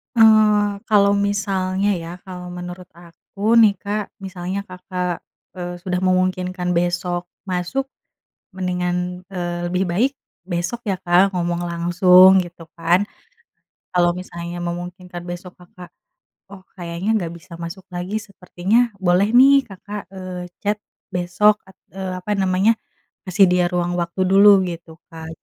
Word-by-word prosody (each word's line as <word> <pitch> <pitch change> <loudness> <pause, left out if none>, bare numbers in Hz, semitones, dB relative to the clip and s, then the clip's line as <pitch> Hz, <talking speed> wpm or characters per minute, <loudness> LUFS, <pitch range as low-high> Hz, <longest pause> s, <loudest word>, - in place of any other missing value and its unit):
Eee, 215 -2 +5 0.2
kalau 200 -1 +5
misalnya, 195 -1 0
ya, 165 - -7 0.2
kalau 180 -1 -7
menurut 180 0 -8
aku, 175 +6 -3
nih, 215 -2 +7
Kak. 210 +1 -2 0.2
Misalnya 190 0 -5
Kakak, 180 -1 -4 0.3
eee, 175 -1 -6
sudah 180 0 -2
memungkinkan 185 0 0
besok 175 0 0 0.2
masuk, 185 +9 -2 0.7
mendingan, 180 0 -2
eee, 175 -1 -3
lebih 185 +1 +1
baik 225 +11 +1 0.3
besok, 175 +6 -3
ya, 195 -4 -2
Kak, 180 +3 +4
ngomong 175 -1 -1
langsung, 180 +2 +6
gitu, 170 -1 -13
kan. 175 +5 +2 0.9
Kalau 175 -1 +4
misalnya 175 -1 -7
memungkinkan 175 +1 -6
besok 175 +1 -8
Kakak, 180 0 -14 0.6
oh, 195 -1 -13
kayaknya 175 +3 -3
enggak 185 -7 0
bisa 170 +1 -15
masuk 170 +3 -7
lagi 180 +4 -3
sepertinya 205 +3 0
boleh, 190 +2 +2
nih, 270 +2 +8 0.2
Kakak, 200 0 -8
eee, 185 -2 -7 0.2
chat 205 +1 0 0.3
besok 180 +4 +2
at 190 - -19 0.2
eee, 190 -1 -4
apa 180 +3 -5
namanya, 195 +2 +3 0.5
kasih 195 +1 +4
dia 180 -1 +2
ruang 175 -1 -1
waktu 170 +2 -3
dulu 195 0 +6
gitu, 170 -2 -7 0.2
Kak. 160 0 -8
180 Hz, 130 wpm, -21 LUFS, 175-195 Hz, 0.9 s, nih